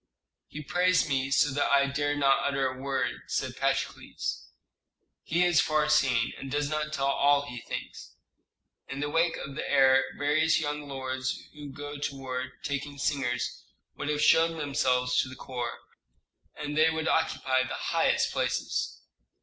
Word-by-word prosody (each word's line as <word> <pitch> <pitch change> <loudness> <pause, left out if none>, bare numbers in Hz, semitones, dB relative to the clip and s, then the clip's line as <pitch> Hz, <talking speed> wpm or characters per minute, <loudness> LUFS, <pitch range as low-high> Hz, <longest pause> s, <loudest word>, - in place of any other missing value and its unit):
"He 155 - -8
praised 180 +2 +2
me 135 -2 0
so 140 +1 +3
that 145 +2 0
I 140 0 +5
dared 145 +1 -1
not 135 -1 +3
utter 135 -1 0
a 130 - -4
word," 135 0 -2
said - - -2
Patrokles. - - -2 0.7
"He 170 +2 +1
is 175 -2 +4
far 155 -1 +1
seeing, 130 -6 +3
and 135 - -7
does 145 +1 -1
not 150 0 -1
tell 135 -3 -1
all 140 +1 +3
he 125 -3 -7
thinks. - - -7 0.7
In 135 - -6
the 145 +1 -2
wake 165 +1 +2
of 140 - -7
the 140 - -4
heir 135 0 +5
various 155 +3 +2
young 150 -1 -3
lords 130 -1 -3
who 145 -2 -9
go 145 +1 -7
to 140 -1 -3
war 130 -1 -5
taking 140 0 -3
singers 135 -4 -1 0.3
would 145 - -4
have 150 0 0
shoved 165 +1 +4
themselves 130 -3 +1
into 130 - 0
the 130 - -11
corps, 120 -2 -4 0.8
and 150 0 -5
they 155 +1 +5
would 160 0 -2
occupy 130 -5 +1
the 130 - -3
highest - - +1
places. - - -2
140 Hz, 165 wpm, -28 LUFS, 135-150 Hz, 0.8 s, I